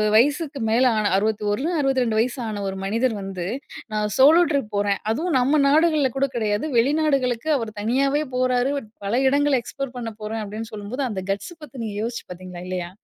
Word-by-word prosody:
வயசுக்கு 285 +4 +2
மேல 235 +4 +4
ஆன 210 -1 +2
61, 210 +5 0
62 260 -5 +1
வயசு 245 +4 0
ஆன 210 -2 -4
ஒரு 190 - -3
மனிதர் 230 +5 +1
வந்து, 195 -3 -5 0.5
"நான் 210 0 0
சோலோ 300 +6 +7
ட்ரிப் 275 -7 -1
போறேன்." 200 -1 +1
அதுவும் 320 +8 0
நம்ம 275 +5 +3
நாடுகள்ல 305 -1 +4
கூட 275 +1 +2
கிடையாது. 210 +1 0
வெளிநாடுகளுக்கு 275 -1 +1
அவர் 230 -4 -3
தனியாவே 275 +7 +1
போறாரு. 255 +1 +2 0.3
"பல 225 +5 +1
இடங்கள 285 +1 +3
எக்ஸ்போர் 275 +1 -6
பண்ண 230 -2 -4
போறேன்." 220 +1 -3
அப்படின்னு 215 +2 -6
சொல்லும்போது 215 +6 -4
அந்த 195 -4 -3
கட்ஸ் 200 - -3
பத்தி, 290 -2 -11
நீங்க 215 -2 -4
யோசிச்சு 235 +1 -4
பார்த்தீங்களா, 180 0 -8
இல்லையா? 180 -2 -3
235 Hz, 170 wpm, -23 LUFS, 210-275 Hz, 0.5 s, சோலோ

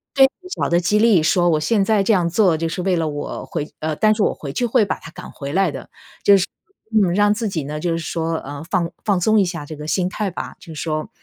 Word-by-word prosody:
对， 270 -1 +7 0.2
小 - - -2
的 170 - +3
激 195 +4 +2
励。 215 -7 +5
说 175 +2 +3
我 155 -2 +2
现 200 +6 +2
在 210 -1 +2
这 220 - +3
样 180 -4 +2
做 180 -2 +3
就 165 +1 -1
是 180 - -3
为 185 0 +1
了 165 -1 0
我 145 -1 -5
回 150 - -4
呃， 155 0 -2
但 215 +5 +3
是 210 - +1
我 - - +2
回 140 - -7
去 245 - 0
会 235 -2 +3
把 - - -2
它 165 - -11
赶 - - -10
回 140 -1 -6
来 190 0 +3
的， - - -9 0.3
就 200 -1 +7
是 185 - +1 0.5
嗯， 200 -6 +3
让 205 +2 +4
自 225 0 -2
己 160 -5 -3
呢 150 +2 -5
就 170 +2 -1
是 165 - -1
说， 165 0 -2
呃， 145 +2 -7
放 175 -3 0
放 200 -4 +1
松 220 +3 +4
一 195 - +3
下 170 -4 -5
这 155 - -8
个 150 0 -8
心 180 +3 0
态 210 0 -2
吧。 - - -6
就 165 - -11
是 150 - -6
说 155 -1 -3
175 Hz, 295 characters per minute, -20 LUFS, 160-205 Hz, 0.5 s, 对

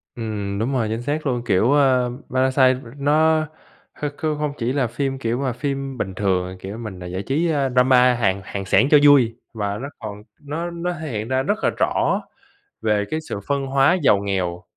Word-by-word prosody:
Ừm, 105 -3 -4
đúng 125 +5 -1
rồi, 115 -4 +1
chính 115 +2 -2
xác 150 +4 -2
luôn, 120 -2 -1
kiểu, 110 +6 +3
a, 130 -4 +3 0.2
Parasite, 130 0 +3
ừm, 115 +1 -12
nó 155 +1 +3 0.6
kh - - -1
kh - - -18
không 150 -2 -1
chỉ 120 +1 -1
là 135 -4 +1
phim, 135 +3 -2
kiểu 115 -1 -1
mà, 130 -3 -1
phim 135 -1 -4
bình 95 -5 -3
thường, 95 -3 0
à, 95 - -7
kiểu, 100 +4 -7
mình, 110 -6 -7
à, - - -6
giải 95 +2 -4
trí, 155 +6 0
a, 140 -3 +1
drama 125 0 +5
Hàn 100 -5 0
Hàn 100 -1 -5
xẻng 130 +7 +4
cho 150 - +9
vui 125 -6 +6 0.2
và 105 -2 -2
nó 135 +5 -5
còn 105 -2 -7 0.2
nó 165 +4 -4
nó 175 +1 -3
thể 155 -2 -5
hiện 110 0 -3
ra 130 0 0
rất - - -1
là - - +4
rõ - - +1 0.6
về 105 -2 +1
cái 155 - 0
sự 105 - -6
phân 140 -1 0
hóa 135 +6 +3
giàu 105 - +5
nghèo. 95 -3 -2
125 Hz, 215 wpm, -22 LUFS, 105-140 Hz, 0.6 s, cho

